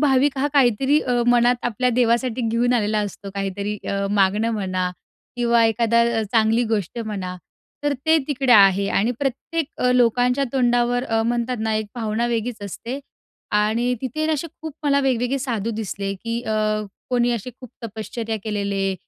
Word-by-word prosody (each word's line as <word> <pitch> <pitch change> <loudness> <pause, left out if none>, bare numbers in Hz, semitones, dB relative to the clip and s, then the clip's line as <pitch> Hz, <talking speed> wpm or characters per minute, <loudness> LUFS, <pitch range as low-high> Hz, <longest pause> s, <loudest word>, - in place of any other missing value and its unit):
भाविक 275 -1 +3
हा 285 - +2
काहीतरी 270 +2 +3
अ, 245 -3 0
मनात 245 0 +4
आपल्या 245 +2 +1
देवासाठी 240 0 +2
घेऊन 240 +2 +1
आलेला 215 -2 +1
असतो 200 -1 -5
काहीतरी 200 +1 -3
अ, 200 0 -1
मागणं 205 +3 +2
म्हणा 185 -3 -1 0.5
किंवा 235 -1 +3
एखादा 230 +1 +3 0.3
चांगली 225 +1 +3
गोष्ट 210 +1 -1
म्हणा. 195 -5 -4 0.5
तर 290 -1 +1
ते 320 0 +6
तिकडे 265 -3 +2
आहे 200 -1 +6
आणि 220 +5 +2
प्रत्येक 280 +3 -2
अ, 250 - +3
लोकांच्या 250 +2 +3
तोंडावर 245 -1 +2
अ, 225 0 0
म्हणतात 240 +1 -1
ना, 220 0 0
एक 215 -1 -1
भावना 225 0 -1
वेगळीच 230 -2 -2
असते 235 +7 -6 0.5
आणि 220 +4 +1
तिथे 310 +4 -2
ना 315 - +1
असे 310 +2 -2 0.2
खूप 315 -2 -5
मला 280 -1 +3
वेगवेगळे 260 0 0
साधू 230 -4 -2
दिसले, 200 -2 -3
की 230 +4 -4
अ, 215 0 -2 0.5
कोणी 245 -1 +2
असे 235 +2 -4
खूप 250 - -10
तपश्चर्या 220 +1 -4
केलेले 200 -2 -1
235 Hz, 160 wpm, -22 LUFS, 210-250 Hz, 0.5 s, ते